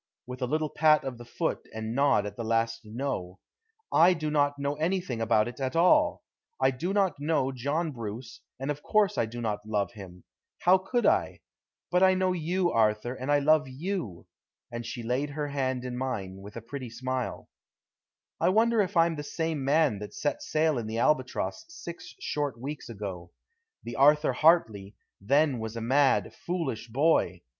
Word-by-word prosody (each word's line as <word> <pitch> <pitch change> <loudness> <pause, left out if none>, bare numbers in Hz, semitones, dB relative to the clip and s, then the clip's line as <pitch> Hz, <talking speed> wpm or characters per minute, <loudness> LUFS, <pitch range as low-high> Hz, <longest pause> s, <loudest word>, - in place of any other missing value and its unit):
with 125 +1 -8
a 125 - 0
little 155 +3 0
pat 155 -1 +4
of 130 -3 -5
the 120 - -10
foot 120 - -3
and 110 0 -4
nod 140 -5 +3
at 100 -1 -6
the 115 - -5
last 115 0 0
"No." 110 -5 -4 0.6
"I 175 +3 +6
do 155 -2 -3
not 145 -1 +2
know 140 0 -1
anything 165 -7 -1
about 110 -1 +3
it 120 - -8
at 130 +2 -2
all. 170 +2 +4 0.4
I 130 0 +3
do 160 +9 -3
not 195 -6 +1
know 145 -3 0
John 145 +6 -2
Bruce, 115 -1 -7 0.2
and 135 +2 -2
of 145 0 -6
course 210 +2 +2
I 115 - +1
do 120 +2 -7
not 105 -2 -2
love 105 -2 -1
him. 95 -5 -11 0.4
How 185 +2 +5
could 240 +6 -1
I? - - +2 0.5
But 180 0 +3
I 190 0 +6
know 185 0 +1
you, 175 +1 0
Arthur, 110 +2 +1
and 130 +2 -3
I 145 - +5
love 150 +1 +3
you," 135 - -4 0.5
and 120 -1 -5
she 120 +1 -5
laid 125 +5 -1
her 145 0 -4
hand 130 -3 -2
in 125 -1 -4
mine, 110 -8 -4
with 100 +2 -11
a 115 - -6
pretty 130 +1 -6
smile. 130 +2 -4 0.9
I - - +3
wonder 225 +3 +3
if 195 -2 -2
I'm 165 -1 +3
the - - -3
same 160 -1 -2
man 140 -5 +2
that 105 - -8
set 220 +8 -2
sail 155 - +1
in 110 - -5
the 110 +1 -4
Albatross 130 0 0
six 175 - -9
short 145 -6 -2
weeks 140 +1 -6
ago? 95 -6 -6 0.5
The 120 - -6
Arthur 150 0 +5
Hartley 115 - +3 0.3
then 140 +4 +2
was 110 0 -5
a 115 - -4
mad, 135 +4 +2
foolish 155 -11 -4
boy. 120 - +1
135 Hz, 185 wpm, -28 LUFS, 115-160 Hz, 0.9 s, I